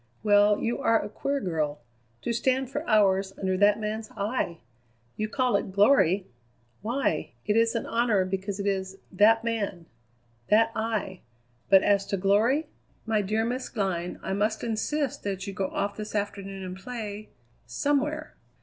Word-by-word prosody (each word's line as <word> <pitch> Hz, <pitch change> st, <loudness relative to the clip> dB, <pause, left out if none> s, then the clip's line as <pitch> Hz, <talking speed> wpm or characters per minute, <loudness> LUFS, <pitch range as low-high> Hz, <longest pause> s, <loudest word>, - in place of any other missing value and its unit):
Well, 205 Hz, 0 st, +5 dB
you 235 Hz, -, -2 dB
are 225 Hz, 0 st, +3 dB
a -, -, -5 dB
queer 280 Hz, +6 st, -2 dB
girl. 155 Hz, -, -2 dB, 0.4 s
To 235 Hz, -, -1 dB
stand 260 Hz, +2 st, 0 dB
for 290 Hz, +2 st, -3 dB
hours 195 Hz, -3 st, +3 dB
under 190 Hz, -1 st, 0 dB
that 205 Hz, +2 st, +4 dB
man's 215 Hz, +1 st, -4 dB
eye! 200 Hz, -4 st, -1 dB, 0.6 s
You 215 Hz, 0 st, -2 dB
call 250 Hz, -1 st, +1 dB
it 200 Hz, -, -1 dB
glory? 195 Hz, -3 st, +4 dB, 0.6 s
Why, 240 Hz, +6 st, -1 dB
it 210 Hz, -, +1 dB
is 230 Hz, +1 st, +3 dB
an 230 Hz, -, -1 dB
honour 230 Hz, -5 st, +2 dB
because 195 Hz, +2 st, -3 dB
it 200 Hz, -, -3 dB
is 190 Hz, -1 st, -2 dB
that 220 Hz, +4 st, +5 dB
man, 205 Hz, -7 st, -2 dB, 0.6 s
that 225 Hz, +2 st, +4 dB
eye; 220 Hz, -4 st, -2 dB, 0.5 s
but 195 Hz, -1 st, +7 dB
as 200 Hz, -1 st, +2 dB
to 200 Hz, -, -1 dB
glory! 215 Hz, -, +3 dB, 0.4 s
My 220 Hz, -2 st, +1 dB
dear 215 Hz, +3 st, 0 dB
Miss 250 Hz, +2 st, -3 dB
Glynn, 185 Hz, -5 st, -2 dB
I -, -, -2 dB
must 210 Hz, +2 st, 0 dB
insist 255 Hz, +5 st, -1 dB
that 195 Hz, -2 st, -3 dB
you 200 Hz, -, -5 dB
go 190 Hz, 0 st, -1 dB
off 200 Hz, +1 st, -3 dB
this 215 Hz, 0 st, -6 dB
afternoon 195 Hz, -1 st, -3 dB
and 185 Hz, 0 st, -6 dB
play 215 Hz, 0 st, -6 dB, 0.4 s
somewhere. 290 Hz, -, -1 dB
210 Hz, 160 wpm, -27 LUFS, 195-230 Hz, 0.6 s, but